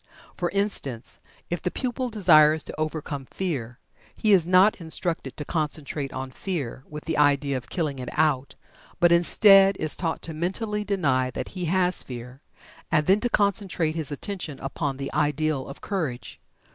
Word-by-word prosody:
For 175 -1 -1
instance, 180 - -1 0.3
if 175 - -2
the - - -1
pupil 255 +3 -3
desires 155 -8 +5
to - - -7
overcome 155 -3 -3
Fear, 130 -9 -4 0.4
he 215 -2 +3
is 175 -4 +4
not 185 +2 +4
instructed 160 -4 -2
to 150 - -5
concentrate 150 -3 -2
on 130 0 -6
Fear 140 -8 -5
with 150 0 -8
the 160 -2 -1
idea 145 -1 +3
of 120 -4 -6
killing 150 -6 -2
it 125 - -5
out, 150 -4 +1 0.4
but, 175 0 +5
instead, 195 +3 +6
is 155 - +2
taught 165 -3 -3
to 165 - -5
mentally 210 +6 -2
deny 145 -11 +1
that - - -5
he 185 -2 -5
has 180 +1 +3
Fear, 125 +2 -9 0.5
and 150 -2 +2
then 195 +5 +4
to 245 - -1
concentrate 200 -7 +1
his 155 -3 -3
attention 160 -2 -5
upon 135 0 -3
the 135 0 -5
ideal 150 -1 0
of 140 - -10
Courage. 140 - -4
155 Hz, 165 wpm, -25 LUFS, 140-185 Hz, 0.5 s, instead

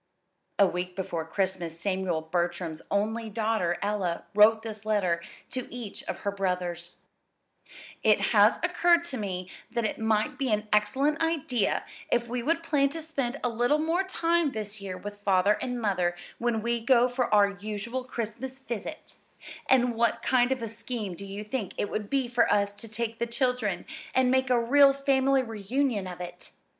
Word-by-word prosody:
A 200 - +7
week 180 0 -3
before 170 -4 -3
Christmas 170 -2 -2
Samuel 185 -3 -1
Bertram's 170 -1 -2
only 220 +3 -1
daughter, 215 -5 0
Ella, 200 -4 -1
wrote 220 +2 +6
this 215 -2 -7
letter 195 -6 +1 0.3
to 255 -1 -4
each 235 -4 -7
of - - -5
her 200 - -1
brothers: 180 -3 -3 1.0
It - - +4
has - - +6
occurred 345 -1 +4
to 285 -7 -5
me 185 -4 -4 0.2
that 235 -2 -1
it 215 - -2
might 220 +2 +1
be 265 -4 0
an 210 0 0
excellent 270 +9 +2
idea 285 -9 0 0.3
if 240 0 +2
we 245 +1 -2
would 330 +6 0
plan 285 -4 +2
to 325 +4 -6
spend 280 -4 -3
a 245 - +2
little 240 +5 +2
more 325 +4 +1
time 340 -5 +1
this 215 -1 -5
year 190 -2 -5
with 205 +1 -8
Father 200 +1 +3
and 245 -1 -2
Mother 185 -5 +1 0.2
when 235 -2 0
we 235 0 0
go 240 +1 +4
for 250 -2 -1
our 205 -1 +5
usual 215 +5 -4
Christmas 250 +2 -5
visit; 255 +3 -6 0.5
and 250 -2 +4
what 230 0 +1
kind 250 0 +3
of 260 -3 -1
a - - -2
scheme 225 -2 -5
do 200 +4 -8
you 200 +2 -6
think 215 -2 -4
it 205 - -2
would 210 -1 -3
be 270 -3 +1
for 240 -1 +2
us 200 0 +2
to 215 +3 -9
take 225 +1 -4
the 235 - 0
children, 235 -6 -1 0.3
and 255 -1 +4
make 260 0 +2
a 250 -1 +4
real 275 +4 +6
family 270 -1 +2
reunion 225 -1 -1
of 180 -1 -7
it? 175 0 -8
225 Hz, 175 wpm, -28 LUFS, 200-255 Hz, 1.0 s, A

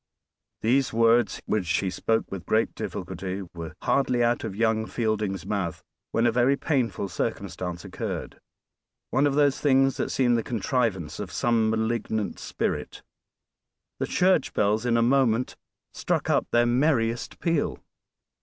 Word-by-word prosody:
These 130 +4 +2
words, 115 -1 +3
which 95 -5 -1
he 95 -1 -1
spoke 110 +4 -1
with 95 -2 -6
great 110 +1 +2
difficulty, 95 +3 -5
were 85 -2 -7
hardly 125 -3 +2
out 120 0 +1
of 95 - -4
young 110 0 +1
Fielding's 105 -4 -1
mouth 95 -6 -3 0.3
when 115 - +2
a 120 - +4
very 125 +4 +3
painful 120 - -1
circumstance 90 -3 -4
occurred; - - -5 0.7
one 135 +3 +3
of 140 - 0
those 145 -2 +3
things 135 -2 +3
that - - -1
seem 125 -2 +2
the 115 - +2
contrivance 115 - -1
of - - -5
some 115 -2 +2
malignant 110 -1 -1
spirit. - - -3 1.0
The - - -1
church 185 -5 +2
bells 105 +3 +1
in 115 -1 +3
a 115 - +3
moment 125 -1 +2 0.4
struck - - -1
up - - +2
their 120 0 +3
merriest 120 -2 +1
peal! 165 -4 0
115 Hz, 145 wpm, -26 LUFS, 105-125 Hz, 1.0 s, a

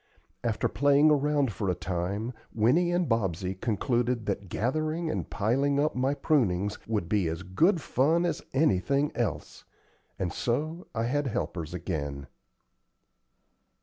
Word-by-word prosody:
After 115 -2 0
playing 145 +2 +4
around 145 -3 +2
for 100 0 -2
a 90 - +1
time, 95 +7 -3 0.2
Winnie 140 +11 +3
and 175 -1 +1
Bobsey 95 -6 0
concluded 120 +3 0
that 100 -2 -3
gathering 155 - -1
and - - -3
piling 135 +7 +1
up 150 +2 +2
my 130 +3 0
prunings 105 - +1
would 105 -6 -1
be 100 -2 +1
as 80 +3 -3
good 165 - +2
fun 160 +5 +2
as 170 +2 -1
anything 140 - +2
else; 120 -3 -3 0.5
and 90 - -2
so 155 +8 -2
I 115 - 0
had 140 +4 0
helpers 85 -7 -3
again. 70 -6 -4
120 Hz, 135 wpm, -28 LUFS, 95-145 Hz, 0.5 s, playing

